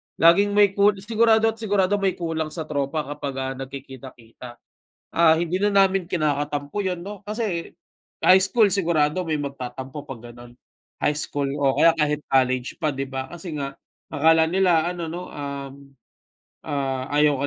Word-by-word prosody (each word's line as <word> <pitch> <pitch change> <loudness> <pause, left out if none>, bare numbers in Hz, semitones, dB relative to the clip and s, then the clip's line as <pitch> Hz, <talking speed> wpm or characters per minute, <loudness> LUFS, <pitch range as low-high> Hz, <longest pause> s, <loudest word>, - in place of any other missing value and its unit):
Laging 200 +5 +4
may 205 -2 +5
kul 200 +1 +3
sigurado't 225 0 +3
sigurado 205 -2 +1
may 195 -1 0
kulang 165 -2 -3
sa 165 - -3
tropa 150 0 -2
kapag, 145 -1 -6
ah, 130 0 -3 0.2
nagkikita-kita. 130 -3 -11 0.6
Ah, 165 -1 +6
hindi 175 +1 -1
na 205 +2 +1
namin 195 -1 +3
kinakatampo 145 +1 -2
yun, 180 -2 -2
'no? 200 +2 -9
Kasi 210 -5 -3 0.5
high 185 +1 +6
school 210 +3 +3
sigurado 170 -3 +1
may 155 -3 -2
magtatampo 135 0 -6
'pag 135 -6 -9
ganon, 120 0 -13 0.5
high 150 - +1
school 145 -2 -2 0.2
o 135 -1 +3
kaya 165 0 +6
kahit 150 -2 0
college 130 -1 +1
pa, 155 - -1
'di 135 0 -4
ba, 135 0 -6
kasi 175 -1 -7
nga 140 -2 -3 0.4
akala 160 +2 +4
nila 180 -4 +3
ano, 175 -2 -5
'no, 175 +3 -7
um, 140 -1 -6 0.9
ah, 135 -2 -2
ayaw 150 -2 +3
155 Hz, 155 wpm, -23 LUFS, 140-190 Hz, 0.9 s, Ah